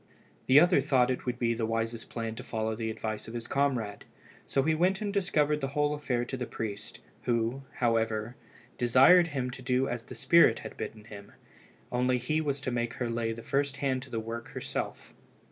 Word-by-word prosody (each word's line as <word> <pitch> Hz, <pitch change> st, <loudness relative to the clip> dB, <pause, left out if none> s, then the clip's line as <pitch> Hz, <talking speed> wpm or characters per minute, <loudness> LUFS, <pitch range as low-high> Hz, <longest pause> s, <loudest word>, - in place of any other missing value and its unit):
The 130 Hz, +2 st, +8 dB
other 175 Hz, -2 st, +5 dB
thought 130 Hz, -3 st, +3 dB
it 130 Hz, -, -4 dB
would 125 Hz, -1 st, -1 dB
be 115 Hz, -1 st, +1 dB
the 115 Hz, -1 st, -2 dB
wisest 115 Hz, 0 st, -2 dB
plan 115 Hz, -1 st, -4 dB
to 120 Hz, +3 st, -8 dB
follow 110 Hz, -2 st, -2 dB
the 110 Hz, 0 st, -3 dB
advice 110 Hz, -1 st, -4 dB
of 115 Hz, -, -8 dB
his 120 Hz, -1 st, -4 dB
comrade, 125 Hz, -7 st, -1 dB, 0.4 s
so 135 Hz, -, +1 dB
he 160 Hz, +2 st, +2 dB
went 185 Hz, +5 st, +2 dB
and 205 Hz, -2 st, -3 dB
discovered 150 Hz, -6 st, +1 dB
the 135 Hz, -, 0 dB
whole 150 Hz, 0 st, +2 dB
affair 130 Hz, -5 st, -1 dB
to 130 Hz, -, -4 dB
the 125 Hz, -1 st, -4 dB
priest, 105 Hz, -3 st, -6 dB, 0.2 s
who, 120 Hz, +2 st, 0 dB
however, 115 Hz, -1 st, 0 dB, 0.4 s
desired 135 Hz, +9 st, +6 dB
him 130 Hz, -5 st, -3 dB
to 130 Hz, -, -9 dB
do 130 Hz, +1 st, +1 dB
as 120 Hz, -1 st, -4 dB
the -, -, -9 dB
spirit 170 Hz, -9 st, +5 dB
had -, -, -7 dB
bidden 110 Hz, -1 st, -6 dB
him, 105 Hz, -2 st, -11 dB, 0.6 s
only 125 Hz, +1 st, +2 dB
he 155 Hz, +6 st, 0 dB
was 145 Hz, -2 st, -1 dB
to 130 Hz, -, -2 dB
make 120 Hz, -1 st, -2 dB
her 120 Hz, -2 st, -2 dB
lay 115 Hz, -1 st, -1 dB
the 115 Hz, 0 st, -7 dB
first 140 Hz, 0 st, -1 dB
hand 130 Hz, -2 st, 0 dB
to -, -, -11 dB
the 115 Hz, -, -2 dB
work 115 Hz, +1 st, -6 dB
herself. -, -, -5 dB
125 Hz, 205 wpm, -29 LUFS, 115-140 Hz, 0.6 s, The